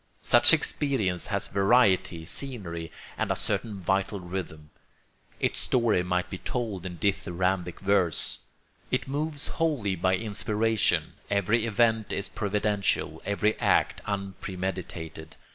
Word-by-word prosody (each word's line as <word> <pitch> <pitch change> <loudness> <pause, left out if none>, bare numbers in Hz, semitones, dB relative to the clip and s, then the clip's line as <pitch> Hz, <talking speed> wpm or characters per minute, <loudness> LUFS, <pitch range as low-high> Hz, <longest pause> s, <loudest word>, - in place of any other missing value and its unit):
Such - - +7
experience 105 -12 +1
has - - 0
variety, 100 -5 +3
scenery, 85 - -2 0.3
and - - 0
a - - +1
certain 105 -4 -1
vital 95 +2 0
rhythm; 85 -4 -6 0.7
its - - +1
story 115 -7 +2
might 90 0 -1
be 90 0 -7
told 105 -7 -3
in 90 -1 -7
dithyrambic 90 -2 -1
verse. 95 -5 +1 0.5
It - - -1
moves 145 +2 -2
wholly 140 -13 0
by 95 +1 +2
inspiration; 110 +2 0 0.2
every 105 +3 +1
event 110 -1 +2
is 100 - -2
providential, 105 0 -1
every 105 +1 +2
act - - +2
unpremeditated. 95 -5 -5
100 Hz, 115 wpm, -27 LUFS, 90-110 Hz, 0.7 s, Such